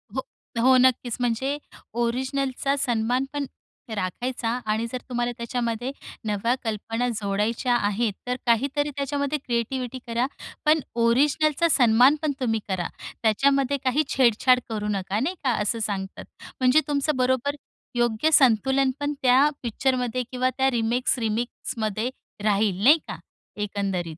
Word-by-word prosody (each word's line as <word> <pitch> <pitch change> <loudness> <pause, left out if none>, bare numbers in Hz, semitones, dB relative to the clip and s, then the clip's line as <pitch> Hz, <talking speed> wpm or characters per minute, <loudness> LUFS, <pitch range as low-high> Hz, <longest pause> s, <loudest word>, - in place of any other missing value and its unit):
हो, - - 0 0.4
हो, 260 +1 +6
नक्कीच 250 -2 +2
म्हणजे 250 +4 0 0.5
ओरिजनलचा 265 +3 -1
सन्मानपण 255 +4 0 0.5
राखायचा 225 +5 -3 0.2
आणि 215 +2 0
जर 255 - -4
तुम्हाला 240 -1 -1
त्याच्यामध्ये 235 +1 -2 0.4
नव्या 210 +3 +1
कल्पना 225 +2 -2
जोडायच्या 215 +5 0
आहेत, 210 0 0
तर 250 - 0
काहीतरी 275 +5 +1
त्याच्यामध्ये 280 +1 -1
क्रिएटिविटी 250 +1 -2
करा. 235 +1 0 0.4
पण 305 +1 +5 0.2
ओरिजनलचा 295 +6 +3
सन्मानपण 265 +5 +4
तुम्ही 225 -4 0
करा. 185 -2 -1 0.4
त्याच्यामध्ये 275 +5 +2
काही 265 +4 +2
छेडछाड 250 0 +4
करू 210 -2 -3
नका, 195 0 -1
नाही 325 +10 -1
का? 260 - +2
असं 210 +2 -1
सांगतात. 195 -3 -4 0.4
म्हणजे 255 +3 +5
तुमचं 290 +1 0
बरोबर 260 +2 +1 0.4
योग्य 240 +5 +1
संतुलनपण 265 +3 +3
त्या 260 +4 +5
पिक्चरमध्ये 250 +1 0
किंवा 255 0 +1
त्या 265 0 +3
रिमेक्स-रिमिक्समध्ये 230 -1 -1 0.3
राहील 205 -2 +1
नाही 290 +7 +8
का, - - -5 0.4
एकंदरीत. 195 -5 -3
245 Hz, 120 wpm, -25 LUFS, 220-270 Hz, 0.5 s, नाही